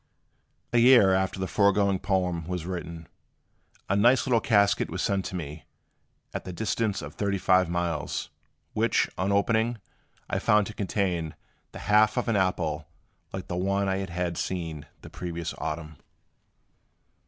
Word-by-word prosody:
A 120 Hz, -, +5 dB
year 120 Hz, -6 st, +7 dB
after 95 Hz, 0 st, 0 dB
the 95 Hz, -, -1 dB
foregoing 100 Hz, -1 st, +3 dB
poem 90 Hz, -5 st, -1 dB
was 90 Hz, -2 st, -3 dB
written, 85 Hz, -2 st, -6 dB, 0.8 s
a 100 Hz, -, +1 dB
nice 120 Hz, +4 st, +4 dB
little 125 Hz, -4 st, +3 dB
casket 100 Hz, -3 st, +3 dB
was 90 Hz, +3 st, -3 dB
sent 95 Hz, -1 st, -1 dB
me, 80 Hz, -4 st, -6 dB, 0.7 s
at -, -, -4 dB
the 95 Hz, -, -6 dB
distance 105 Hz, +2 st, -1 dB
of -, -, -8 dB
thirty 100 Hz, -1 st, -1 dB
five 95 Hz, -1 st, +3 dB
miles, 85 Hz, -3 st, -2 dB, 0.4 s
which, -, -, +2 dB
on 95 Hz, +2 st, -1 dB
opening, 110 Hz, +4 st, +2 dB, 0.5 s
I -, -, -1 dB
found 105 Hz, -1 st, +3 dB
to 110 Hz, -, -7 dB
contain 90 Hz, -6 st, -2 dB, 0.4 s
the -, -, -9 dB
half 105 Hz, +2 st, +4 dB
of 125 Hz, -, 0 dB
an 115 Hz, -, +1 dB
apple 85 Hz, -5 st, 0 dB, 0.4 s
like -, -, -6 dB
the 90 Hz, -, -3 dB
one 100 Hz, +2 st, 0 dB
I 95 Hz, 0 st, 0 dB
had 85 Hz, 0 st, -2 dB
seen 80 Hz, -5 st, -4 dB, 0.2 s
the -, -, -9 dB
previous 85 Hz, -2 st, -5 dB
autumn. 75 Hz, -1 st, -5 dB
95 Hz, 150 wpm, -27 LUFS, 85-100 Hz, 0.8 s, year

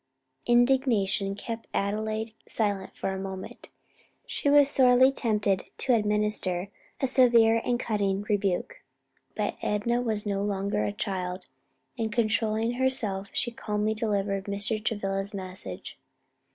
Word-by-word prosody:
Indignation 240 Hz, -6 st, +3 dB
kept 225 Hz, +2 st, -6 dB
Adelaide 215 Hz, +2 st, -1 dB
silent 200 Hz, -3 st, -2 dB
for -, -, -2 dB
a 190 Hz, -, -4 dB
moment, 190 Hz, -1 st, -7 dB, 0.6 s
she 285 Hz, -, -1 dB
was 290 Hz, -1 st, +7 dB
sorely 260 Hz, -1 st, +5 dB
tempted 210 Hz, -7 st, 0 dB
to 260 Hz, -, +2 dB
administer 210 Hz, -4 st, 0 dB, 0.3 s
a -, -, +1 dB
severe 235 Hz, -3 st, +5 dB
and 240 Hz, -1 st, 0 dB
cutting 200 Hz, -4 st, 0 dB
rebuke. 205 Hz, -, -1 dB, 0.5 s
But -, -, -2 dB
Enna 235 Hz, +4 st, 0 dB
was 220 Hz, -3 st, -2 dB
no 200 Hz, -1 st, -1 dB
longer 200 Hz, -, -1 dB
a 105 Hz, -, -1 dB
child, 180 Hz, -, -4 dB, 0.5 s
and 220 Hz, -1 st, -1 dB
controlling 220 Hz, 0 st, +1 dB
herself 240 Hz, -6 st, -1 dB
she 240 Hz, -, -1 dB
calmly 210 Hz, -1 st, -1 dB
delivered 200 Hz, -3 st, -1 dB
Mr. 205 Hz, +2 st, -2 dB
Travilla's 200 Hz, -3 st, -2 dB
message. 185 Hz, -, -7 dB
210 Hz, 125 wpm, -27 LUFS, 195-235 Hz, 0.6 s, was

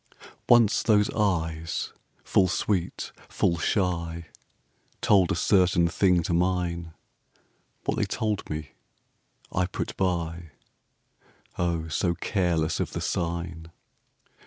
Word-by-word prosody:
Once 120 Hz, -3 st, +6 dB
those 105 Hz, -2 st, +3 dB
eyes, 80 Hz, -6 st, -1 dB, 0.3 s
full 95 Hz, -, +3 dB
sweet, 90 Hz, 0 st, -1 dB, 0.2 s
full 85 Hz, -1 st, +1 dB
shy, 85 Hz, -3 st, -1 dB, 0.7 s
Told 95 Hz, -5 st, +4 dB
a -, -, +1 dB
certain 90 Hz, -2 st, +3 dB
thing 90 Hz, 0 st, +2 dB
to 85 Hz, -, -1 dB
mine; 85 Hz, -2 st, 0 dB, 0.9 s
What -, -, 0 dB
they -, -, +2 dB
told 105 Hz, -3 st, -2 dB
me 75 Hz, 0 st, -5 dB, 0.8 s
I 90 Hz, 0 st, +1 dB
put 90 Hz, -, -4 dB
by, 85 Hz, -3 st, -2 dB, 1.1 s
O, 85 Hz, -2 st, 0 dB
so 85 Hz, +2 st, 0 dB
careless 85 Hz, -6 st, 0 dB
of -, -, -2 dB
the -, -, -3 dB
sign. 85 Hz, -1 st, -3 dB
85 Hz, 110 wpm, -26 LUFS, 85-95 Hz, 1.1 s, Once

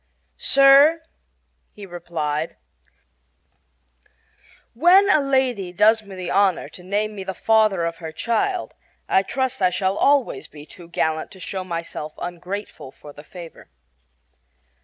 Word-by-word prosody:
"Sir," 280 Hz, +4 st, +5 dB, 0.7 s
he 205 Hz, -, -10 dB
replied, 165 Hz, -3 st, -4 dB, 2.2 s
"when 360 Hz, -, +5 dB
a -, -, +5 dB
lady 260 Hz, -9 st, 0 dB
does 215 Hz, +5 st, +4 dB
me 200 Hz, -2 st, -12 dB
the 185 Hz, -1 st, -5 dB
honor 195 Hz, -1 st, +2 dB
to -, -, -13 dB
name 205 Hz, +4 st, -2 dB
me 195 Hz, -2 st, -7 dB
the 190 Hz, 0 st, -5 dB
father 215 Hz, -5 st, +2 dB
of 165 Hz, 0 st, -4 dB
her 165 Hz, -2 st, -7 dB
child 350 Hz, -, -2 dB, 0.3 s
I 190 Hz, -, +3 dB
trust 260 Hz, +3 st, -3 dB
I 185 Hz, -, +4 dB
shall 190 Hz, +2 st, -1 dB
always 275 Hz, -, +2 dB
be 150 Hz, 0 st, -13 dB
too 170 Hz, +1 st, -13 dB
gallant 160 Hz, -2 st, -2 dB
to 190 Hz, -, -14 dB
show 185 Hz, +1 st, -5 dB
myself 165 Hz, -3 st, -6 dB
ungrateful 180 Hz, -2 st, -7 dB
for 145 Hz, +1 st, -14 dB
the 145 Hz, -, -13 dB
favor." 170 Hz, 0 st, -12 dB
190 Hz, 135 wpm, -22 LUFS, 170-230 Hz, 2.2 s, Sir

